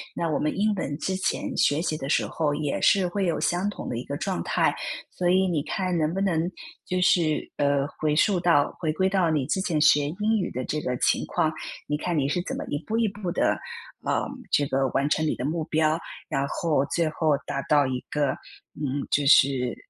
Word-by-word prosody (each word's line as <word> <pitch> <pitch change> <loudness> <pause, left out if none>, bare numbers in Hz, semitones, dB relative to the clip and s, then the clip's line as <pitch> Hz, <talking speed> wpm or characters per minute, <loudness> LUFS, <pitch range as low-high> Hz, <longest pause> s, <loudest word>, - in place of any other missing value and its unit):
那 165 - -1
我 150 - 0
们 150 - -1
英 210 +2 +2
文 145 -6 -3
之 190 0 -1
前 190 - -2
学 145 +3 +3
习 155 -3 -1
的 135 - -5
时 140 - +2
候 150 -3 -1
也 150 -2 -2
是 195 -3 +4
会 195 +1 -1
有 170 -3 0
相 180 +4 +1
同 205 - -6
的 115 - -3
一 120 - -5
个 140 - -4
状 190 +4 -2
态， - - +2 0.4
所 175 -1 -1
以 190 +1 +4
你 165 -5 0
看 180 +3 -1
能 155 0 0
不 195 - -1
能 175 -3 +1 0.4
就 185 0 -1
是， 165 -4 +2
呃， 140 -1 +2
回 150 -1 +1
溯 185 +2 +3
到 165 -5 +3
回 155 -3 -1
归 190 +3 +1
到 190 -4 +2
你 150 -5 +1
之 190 - 0
前 165 -5 0
学 145 -1 +5
英 210 +7 0
语 180 - -2
的 130 - -3
这 150 - -2
个 125 -4 -2
情 - - +2
况， 160 -3 0 0.3
你 150 - -1
看 170 +1 -2
你 140 -1 +1
是 175 +4 0
怎 - - -4
么 - - -4
一 145 +2 -2
步 220 - -1
一 225 -3 +2
步 200 -2 -5
地， - - -2 0.6
啊， - - +1 0.3
这 145 - +4
个 135 0 +1
完 140 +2 +1
成 155 - +1
你 - - 0
的 125 - -5
目 155 +2 -1
标， 155 +1 +1 0.3
然 135 0 0
后 150 -2 0
最 165 +2 0
后 155 -1 0
达 140 - -2
到 145 -2 +4
一 130 -1 -2
个， 145 -2 +1 0.5
嗯， 140 -1 -2
就 145 - +1
是 130 -3 +4
155 Hz, 245 characters per minute, -25 LUFS, 145-180 Hz, 0.6 s, 学